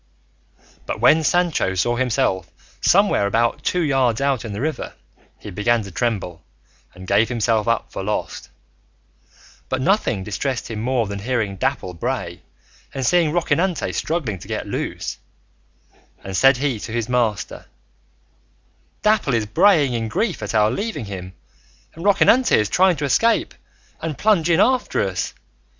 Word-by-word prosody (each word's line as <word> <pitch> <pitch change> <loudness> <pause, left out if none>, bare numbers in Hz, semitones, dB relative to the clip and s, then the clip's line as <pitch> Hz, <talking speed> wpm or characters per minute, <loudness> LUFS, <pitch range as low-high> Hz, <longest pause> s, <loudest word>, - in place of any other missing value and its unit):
But - - -3
when 155 +7 +5
Sancho 165 - +1
saw 120 +6 +1
himself 120 -6 0 0.3
somewhere 195 - +3
about 115 +3 0
two 180 - 0
yards 135 -7 +1
out 135 -3 0
in 115 - -6
the 100 - -5
river, 155 +4 -3 0.4
he 105 - -9
began 110 +4 +1
to 100 - -9
tremble 90 -3 -2 0.5
and 95 +1 -10
give 110 +4 +3
himself 115 -2 0
up 115 -1 0
for - - -5
lost; 105 +2 -4 1.2
but 130 - -1
nothing 130 - +1
distressed 120 +5 -3
him 110 -1 -4
more 125 -1 0
than 100 0 -5
hearing 110 -3 -2
Dapple 130 -5 -2
bray 85 - -4 0.5
and 135 -1 -2
seeing 165 +2 +3
Rocinante 170 +1 0
struggling 140 - -2
to - - -12
get - - -3
loose, - - -4 1.0
and 95 0 -6
said 135 +5 +5
he 135 -4 -1
to 110 - -7
his 115 -1 -2
master, 120 -4 -1 1.4
"Dapple 210 - +2
is 110 -2 0
braying 145 - +3
in 115 -1 -2
grief 180 - -2
at 105 +1 -4
our 105 0 +4
leaving 205 - -3
him, 95 -2 -7 0.6
and 165 - -10
Rocinante 205 +5 +4
is 105 -1 +1
trying 185 -1 +3
to 145 -1 -3
escape 230 - +2 0.5
and 160 -3 -4
plunge 195 -6 +2
in 170 0 +3
after 255 - +1
us. 95 -1 -4
125 Hz, 150 wpm, -21 LUFS, 105-160 Hz, 1.4 s, when